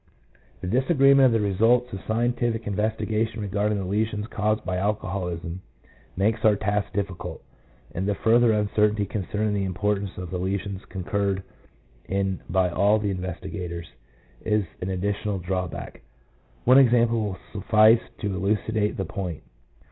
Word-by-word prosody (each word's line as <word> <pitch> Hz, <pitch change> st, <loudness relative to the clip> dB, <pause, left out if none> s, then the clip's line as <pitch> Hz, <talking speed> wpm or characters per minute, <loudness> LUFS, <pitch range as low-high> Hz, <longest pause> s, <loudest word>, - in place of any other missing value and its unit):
2 -, -, -4 dB
The 120 Hz, +8 st, +2 dB
disagreement 135 Hz, -1 st, +5 dB
of -, -, +2 dB
the 110 Hz, -3 st, +1 dB
results 115 Hz, +5 st, +2 dB
of 95 Hz, -, -4 dB
scientific 120 Hz, 0 st, 0 dB
in 105 Hz, -, -2 dB
vestigation 110 Hz, +1 st, -1 dB
regarding 105 Hz, +1 st, 0 dB
the 95 Hz, -, -3 dB
lesions 105 Hz, +2 st, -1 dB
caused 110 Hz, 0 st, 0 dB
by 90 Hz, -, -1 dB
alcoholism 95 Hz, -4 st, -3 dB, 0.6 s
makes 110 Hz, +3 st, +1 dB
our 110 Hz, -1 st, +5 dB
task 100 Hz, +1 st, -1 dB
difficult, 100 Hz, -3 st, -4 dB, 0.5 s
and 95 Hz, +3 st, -2 dB
the 105 Hz, -, +1 dB
further 115 Hz, +3 st, +4 dB
uncertainty 105 Hz, 0 st, +2 dB
concerning 105 Hz, +2 st, -2 dB
the 100 Hz, -1 st, 0 dB
importance 100 Hz, +2 st, -1 dB
of 90 Hz, -1 st, -6 dB
the 90 Hz, -, -2 dB
lesions 95 Hz, +1 st, -3 dB
concurred 95 Hz, +1 st, -2 dB, 0.6 s
in 95 Hz, 0 st, -1 dB
by 95 Hz, 0 st, +3 dB
all 100 Hz, +4 st, +3 dB
the 105 Hz, -2 st, -1 dB
investigators, 90 Hz, -2 st, -5 dB, 0.5 s
is 105 Hz, -2 st, +1 dB, 0.2 s
an 90 Hz, -, -2 dB
additional 100 Hz, +2 st, -1 dB
drawback. 90 Hz, -1 st, -4 dB, 0.6 s
One 130 Hz, +2 st, +7 dB
example 120 Hz, -3 st, +4 dB
will 100 Hz, -3 st, -3 dB, 0.2 s
suffice 110 Hz, +2 st, +5 dB, 0.2 s
to 100 Hz, -2 st, -2 dB
elucidate 105 Hz, +2 st, 0 dB
the 95 Hz, -, -2 dB
point. 90 Hz, -2 st, -5 dB
105 Hz, 145 wpm, -25 LUFS, 95-110 Hz, 0.6 s, One